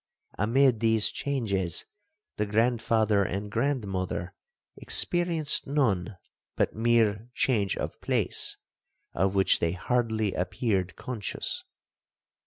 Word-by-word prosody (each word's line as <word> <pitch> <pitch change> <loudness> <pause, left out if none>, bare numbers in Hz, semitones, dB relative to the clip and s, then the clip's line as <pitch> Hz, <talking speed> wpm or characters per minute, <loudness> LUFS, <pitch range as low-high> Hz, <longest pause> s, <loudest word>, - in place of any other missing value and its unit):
Amid 120 +3 +3
these 110 -1 +2
changes, 100 - -1 0.5
the 105 - 0
grandfather 110 -1 +2
and 100 +2 -4
grandmother 100 -8 -2 0.4
experienced 170 -4 +1
none 110 -9 0 0.4
but - - +1
mere 115 -1 +2
change 105 -7 +1
of - - -5
place, - - 0 0.6
of 95 +2 +1
which 95 -1 +4
they 85 0 0
hardly 110 0 0
appeared 95 0 -1
conscious. 120 -5 -4
110 Hz, 95 wpm, -28 LUFS, 95-120 Hz, 0.6 s, which